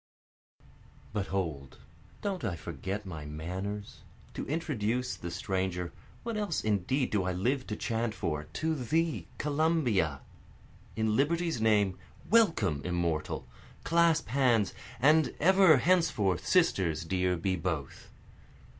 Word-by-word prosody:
4 - - -29 0.5
But 105 -2 -1
hold 80 -8 -3 0.5
don't 195 -4 -2
I 100 -7 -1
forget 95 +6 -5
my 80 -5 -6
manners? 90 +7 -5 0.3
To - - -5
introduce 125 -6 -1
the 85 - -6
stranger, 90 -1 -2 0.3
(what 230 -2 -3
else 205 -6 -1
indeed 110 +6 0
do 105 - +2
I 90 0 -1
live 125 +8 0
to 105 - -3
chant 115 0 -2
for?) 75 -5 -2
to 160 - -2
thee 160 +4 -1
Columbia; 140 - +1 0.7
In 110 -1 +1
liberty's 165 0 +1
name 105 -4 +3 0.3
welcome 165 - +3
immortal! 85 -3 -2 0.4
clasp 165 -4 +3
hands, 120 -5 +2 0.3
And 150 +4 +4
ever 185 -2 +6
henceforth 125 - +2
sisters 90 - +2
dear 90 +1 0
be 95 +3 0
both. 80 -5 -4
105 Hz, 120 wpm, -30 LUFS, -, 0.7 s, ever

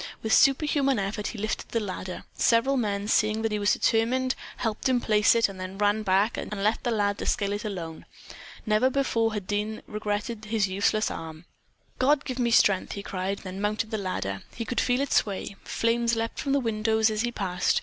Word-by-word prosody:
With 220 - +1
superhuman 275 -1 +4
effort 205 +1 -2
he 230 - -6
lifted 215 +1 -3
the 230 - 0
ladder. 185 -3 -5
Several 235 +4 +3
men 205 -5 -1
seeing 215 0 +2
that 225 - 0
he 210 - -1
was 205 0 +3
determined 255 +3 +1 0.2
helped 225 +2 -1
him 255 -1 +3
place 215 -1 +3
it, 230 -1 +4
then 190 -1 -5
ran 205 +1 +2
back, 200 +2 +2
and - - -5
left 215 +2 +1
the 245 - 0
lad 205 -3 0
to - - -4
scale 200 -3 0
it 205 - -4
alone. 170 -6 -6 0.6
Never 215 +4 +3
before 230 -5 0
had 205 -3 -4
Dean 210 +2 -2
so - - -16
regretted 210 +1 -3
his 215 -2 +1
useless 200 +3 +1
arm. 160 +1 -8 0.5
"God, 275 +2 +3
give 255 -1 -4
me 240 -1 +2
strength!" 200 -4 +3
he 200 - -6
cried; 195 +1 -3
then 190 0 -6
mounted 215 +1 -1
the 220 - -1
ladder. 100 - -3
He 230 - -4
could 245 - 0
feel 250 +1 +1
it 280 - -1
sway. 200 -1 0
Flames 235 0 +1
leaped 225 0 -3
from 275 - -1
the 280 - +3
windows 220 -2 +1
as 215 0 -1
he 240 0 -1
passed. 185 -5 0
215 Hz, 205 wpm, -27 LUFS, 200-235 Hz, 0.6 s, superhuman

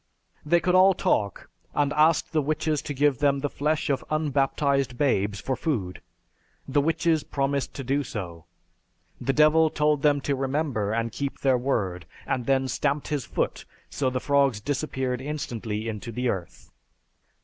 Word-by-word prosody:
They 170 +3 +3
could 180 +2 0
all 185 +1 +6
talk, 100 - 0 0.3
and 145 -1 +1
asked 155 +2 +3
the 155 - +2
witches 150 0 -1
to 145 - -5
give 140 -1 +2
them 140 -2 +3
the 145 - -2
flesh 150 +2 -1
of 140 -2 0
unbaptized 140 -3 0
babes 105 -8 +1
for 130 - -2
food. 110 - -3 0.7
The 140 +1 +2
witches 160 +1 +1
promised 140 0 -2
to 135 - -5
do 140 +3 0
so. 85 -8 -7 0.8
The 135 - +2
Devil 155 +2 +5
told 150 -1 +1
them 145 -1 +3
to 140 0 0
remember 135 -6 -1
and 115 +1 -1
keep 140 +4 -4
their 135 -1 +3
word 100 -9 -2 0.2
and 125 -2 -2
then 135 -1 +2
stamped 145 +2 -1
his 145 -4 -2
foot, - - -2 0.4
and 130 -2 +2
the 130 - -1
frogs 140 -5 +2
disappeared 130 0 -2
instantly 115 -7 -4
into 110 +1 -5
the 125 +2 -1
earth. 90 -6 -5
140 Hz, 160 wpm, -26 LUFS, 125-150 Hz, 0.8 s, all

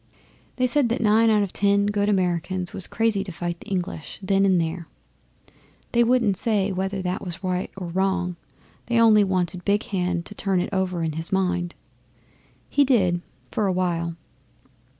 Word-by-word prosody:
They 255 - +1
said 255 0 +2
that 235 - -1
nine 225 +1 +4
out 210 -2 +3
of 195 - -5
ten 200 0 +2
good 205 0 0
Americans 180 -1 0
was 185 - +3
crazy 225 -3 0
to 195 - -7
fight 170 0 -4
the - - -14
English 180 -4 -4
then 195 +1 +3
and 185 -2 +3
there. 165 0 -3 1.0
They 235 0 +4
wouldn't 235 -5 +2
say 205 -2 +1
whether 190 +1 -2
that 180 0 -3
was 180 +1 -5
right 185 0 -1
or 185 - -5
wrong; 180 0 -1 0.5
they 235 0 +2
only 220 -2 +6
wanted 185 -2 -1
Big 205 +1 +1
Hand 180 -5 -2
to - - -6
turn 195 -2 0
it 180 - -3
over 185 -3 -1
in 160 - -1
his 160 +2 -3
mind. 180 -2 0 0.9
He 285 - +3
did 190 -10 +2 0.3
for 210 - 0
a - - +2
while. 170 -2 -1
190 Hz, 175 wpm, -24 LUFS, 180-205 Hz, 1.0 s, only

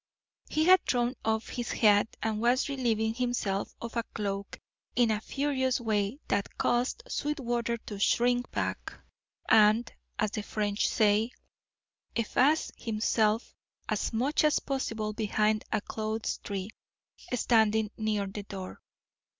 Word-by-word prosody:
He 310 - +1
had 370 +1 +7
thrown 245 0 +1
off 220 0 0
his 240 -1 -3
hat 205 -1 +3
and 220 -1 -1
was 245 +4 +3
relieving 225 -5 0
himself 235 -5 -2
of 235 0 -7
a 230 - +2
cloak 200 -2 -3 0.4
in 235 -2 +4
a 210 -1 -1
furious 265 -1 0
way 215 0 0
that 200 - -1
caused 245 - 0
Sweetwater 240 - -1
to 205 -2 -6
shrink 245 +4 +2
back, - - -3 0.5
and, 220 +2 +5 0.2
as 215 -3 0
the 215 - -3
French 205 0 -1
say, 215 +1 +3 0.9
efface 265 +7 +2
himself 220 0 0 0.3
as - - -1
much 260 +8 +1
as 305 -1 +4
possible 225 -6 -2
behind 215 0 +1
a - - +1
clothes 220 +1 -3
tree 200 0 -5 0.6
standing 220 -3 +3
near 215 -2 -1
the 195 +2 -6
door. 190 -2 -8
220 Hz, 130 wpm, -29 LUFS, 210-245 Hz, 0.9 s, had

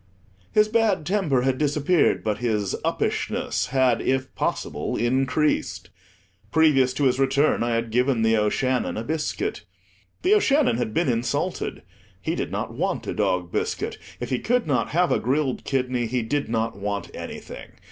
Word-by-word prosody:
His 215 0 +4
bad 215 -7 +1
temper 160 -9 +1
had 130 0 0
disappeared, 150 +3 +2
but 105 -1 -1
his 105 -5 0
"uppishness" - - -1
had, 130 -2 +2
if 130 0 -1
possible, - - -2
increased. 130 - 0 0.6
Previous 150 -5 +4
to 145 - -1
his 130 -1 +2
return, 135 +1 +2
I 120 0 +1
had 115 0 -2
given 125 0 +2
The 110 0 +4
O'Shannon 120 +4 0
a 110 - -3
biscuit. 160 - -2 0.6
The 375 - +4
O'Shannon 295 - +3
had 120 -3 -2
been 170 - +2
insulted; 120 -1 -1 0.4
he - - -2
did - - -3
not - - -3
want - - -2
a - - -3
dog 90 -1 0
biscuit; - - -2 0.2
if 120 0 -5
he 125 - +1
could 245 +1 +1
not 140 -4 0
have 175 +2 +2
a - - +3
grilled 135 +2 -1
kidney 125 -3 0
he 125 +1 -1
did 140 +4 -1
not 115 0 -1
want 100 0 -4
anything. - - -8
130 Hz, 160 wpm, -24 LUFS, 115-150 Hz, 0.6 s, His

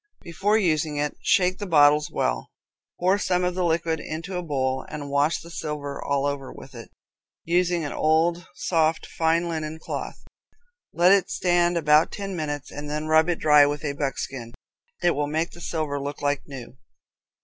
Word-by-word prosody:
Before 195 +6 +1
using 155 -6 0
it, 145 0 -1
shake 185 -3 +2
the 205 - -4
bottles 150 -2 +5
well. - - -1 0.5
Pour 185 +3 +2
some 180 -2 0
of 180 0 0
the 185 0 -1
liquid 165 -1 0
into 165 +5 -6
a 180 - -1
bowl, 130 -5 -1
and 145 -2 -6
wash 145 +3 +2
the 170 - -12
silver 150 -3 -5
all 140 0 0
over 140 -2 -3
with 135 - -12
it, 115 -2 -10 0.6
using 175 -1 +1
an 145 - -4
old, 170 +3 +1
soft, 165 -2 +1
fine 165 +1 0
linen 160 -1 -4
cloth. 160 - -6 0.7
Let 175 +2 +4
it 200 -1 +4
stand 175 -1 +2
about 150 -1 +4
ten 195 -2 -5
minutes, 145 -3 -4
and 145 +1 -7
then 150 +1 -3
rub 160 +2 +4
it 175 - +1
dry 150 -2 +6
with 145 +1 -3
a 140 - -1
buckskin. 135 -4 -4 0.5
It 175 - +4
will 145 -1 -1
make 160 +3 -1
the 170 - -13
silver 155 -4 -2
look 145 +1 -5
like 145 0 -1
new. 130 -3 -10
155 Hz, 180 wpm, -24 LUFS, 145-175 Hz, 0.7 s, dry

